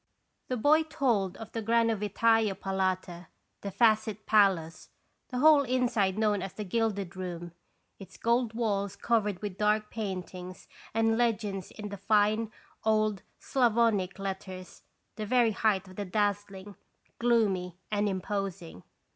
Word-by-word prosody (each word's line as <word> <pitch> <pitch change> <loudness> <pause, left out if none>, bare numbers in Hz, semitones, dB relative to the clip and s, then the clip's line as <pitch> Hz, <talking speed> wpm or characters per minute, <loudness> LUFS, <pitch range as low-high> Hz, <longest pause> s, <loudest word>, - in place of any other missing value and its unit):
The 255 - -2
boy 295 +7 +4
told 245 - 0
of 225 -1 -9
the 225 - -3
Granovitai'a 225 -1 +2
Palata, 185 -3 -2 0.3
the 200 - -4
Facet 215 0 +2
Palace, 190 -6 +2 0.4
the 250 - -4
whole 300 +2 +6
inside 240 -7 +1
known 210 -2 +1
as 195 0 -5
the 210 - -5
Gilded 200 -2 -1
Room, 175 -2 -6 0.5
its 195 - -12
gold 235 -1 +1
walls 200 -4 -1
covered 210 -3 0
with 195 -2 -5
dark 210 0 +1
paintings 185 -3 -6 0.3
and 225 0 +2
legends 210 -5 -1
in 210 -1 -8
the 200 - -6
fine 215 +2 +2 0.3
old 215 -3 +1 0.2
Sclavonic 230 -7 +1
letters, 190 -1 -6 0.4
the 215 - -3
very 240 -1 +3
height 200 -2 +1
of 185 - -14
the 205 - -3
dazzling, 205 0 -2 0.4
gloomy, 200 -7 +1
and 205 0 +1
imposing. 190 - -4
210 Hz, 130 wpm, -29 LUFS, 190-225 Hz, 0.5 s, whole